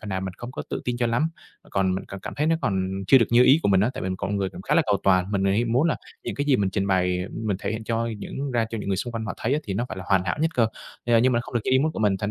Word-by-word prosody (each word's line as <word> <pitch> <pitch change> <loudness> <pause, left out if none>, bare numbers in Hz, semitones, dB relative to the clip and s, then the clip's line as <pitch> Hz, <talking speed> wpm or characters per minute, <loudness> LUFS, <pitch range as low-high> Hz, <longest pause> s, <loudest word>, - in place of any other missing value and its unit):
phần 110 - -8
nào 95 -1 -2
mình 95 -1 -5
không 120 +1 -7
có - - -5
tự - - -2
tin 125 -1 -1
cho 120 0 +1
lắm. 120 +7 +1 0.4
Còn 95 -1 +1
mình 95 - -4
cảm 100 - -7
cảm - - -7
thấy 150 - 0
nó 165 0 +3
còn 100 - +1 0.3
chưa 135 - +7
được 115 - +3
như 120 +1 +6
ý 135 +4 +6
của - - +2
mình 95 -1 +4
á, 110 +5 +2
tại - - -5
vì 95 - -2
mình 95 - -2
con 100 +2 -2
người 100 -1 0
cũng 90 - -10
khá - - 0
là - - +5
cầu 105 -2 +3
toàn, 95 0 +3
mình 100 -1 +1
thì 95 - +3
hay 110 +5 +2
muốn 125 +7 +2
là 150 - +1 0.3
những - - -3
cái 145 - -1
gì 140 -3 +4
mình 100 -3 0
trình 100 0 -1
bày 90 -1 +1
mình 110 -4 -2
thể - - -2
hiện 110 0 -5
cho 115 +1 -1
những 135 +6 -5
ra 120 -2 +1
cho 115 - -3
những 100 - -5
người 95 - +1
xung 120 +5 -3
quanh 115 -1 -3
họ 95 - -4
thấy - - -1
á, 145 - +2
thì 100 - -3
nó 120 +5 -1
phải - - -6
là 95 - -7
hoàn 95 -2 +2
hảo 90 - -1
nhất 160 +1 +2
cơ. 115 -2 +3 0.4
Ờ, 120 -1 +5
nhưng 125 +3 +3
mà 120 - +2
không 120 - -10
được 120 - +2
như - - 0
ý 130 - +5
muốn 155 +3 +1
của - - -6
mình, 105 -3 +2
thành 105 +1 -2
110 Hz, 375 wpm, -25 LUFS, 95-120 Hz, 0.4 s, chưa